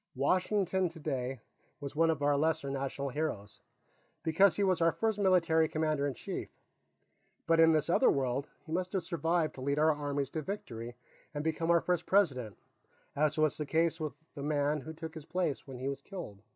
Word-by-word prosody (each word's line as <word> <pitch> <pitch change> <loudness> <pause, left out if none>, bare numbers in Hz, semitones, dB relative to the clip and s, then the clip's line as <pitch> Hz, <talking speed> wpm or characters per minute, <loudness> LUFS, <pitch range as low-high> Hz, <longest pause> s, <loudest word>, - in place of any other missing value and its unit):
Washington, 185 +5 +1
today, 135 -6 -4 0.4
is 140 0 -6
one 165 +1 +3
of 150 -3 0
our 145 0 +3
lesser 155 -1 0
national 140 0 -3
heroes, 125 -8 -4 0.6
because 165 +2 +4
he 200 - +1
was 185 -3 +2
our 165 0 +5
first 220 +3 -1
military 165 -5 +3
commander 155 -2 0
in 135 - -3
chief. - - -5 1.0
But 165 0 +3
in 165 0 +7
this 155 -1 +2
other 180 +10 +4
world, 135 0 0 0.2
he 160 - -10
must 180 +2 -2
have 190 -3 0
survived 165 0 0
to 130 - -10
lead 140 +2 0
our 155 +1 +4
armies 145 -2 -2
to 155 - -3
victory 120 - -6 0.4
and 145 - -2
become 160 +1 -1
our 170 -1 +5
first 180 -1 -1
President, 135 - +2 0.6
as 150 +1 +1
was 155 -1 +2
the 150 - -3
case 165 +1 +1
with 155 -2 -3 0.2
the 140 - -7
man 145 0 0
who 160 +3 -8
took 160 0 -7
his 160 -3 -9
place 175 -7 -2
when 130 -2 -7
he 130 +2 -4
was 140 0 -3
killed. 165 - -8
155 Hz, 190 wpm, -32 LUFS, 140-165 Hz, 1.0 s, in